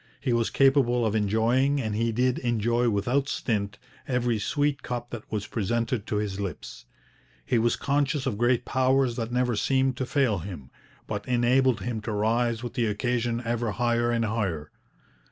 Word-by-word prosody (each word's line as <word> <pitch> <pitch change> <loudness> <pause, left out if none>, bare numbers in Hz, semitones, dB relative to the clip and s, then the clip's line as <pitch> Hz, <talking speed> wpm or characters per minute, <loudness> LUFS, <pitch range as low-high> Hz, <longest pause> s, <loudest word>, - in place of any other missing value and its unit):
He 125 - 0
was 115 -1 +1
capable 135 -3 +3
of 110 - 0
enjoying, 115 +7 +2
and 110 -5 -2
he 115 +2 0
did 125 +2 +1
enjoy 120 0 +1
without 125 +7 0
stint, 100 -3 -2 0.3
every 125 -3 0
sweet 145 +6 0
cup 120 -1 -5
that 120 -2 -8
was 105 -2 -2
presented 115 +1 -2
to - - -2
his 105 -2 -2
lips. 90 -10 -6 0.6
He 120 - +2
was 115 +1 +2
conscious 140 0 0
of 130 -6 -1
great 120 0 +2
powers 130 -1 +2
that 115 -1 -3
never 125 -1 +1
seemed 130 +3 +1
to 130 - -2
fail 125 -8 +1
him, 80 -7 -8 0.3
but 105 -1 -5
enabled 125 0 +3
him 115 -2 -3
to 110 0 -4
rise 115 +2 0
with 120 - -5
the 120 -3 0
occasion 120 +2 -1
ever 115 -2 -1
higher 120 0 +1
and 115 -1 +1
higher. 95 -9 -2
120 Hz, 170 wpm, -26 LUFS, 110-125 Hz, 0.6 s, capable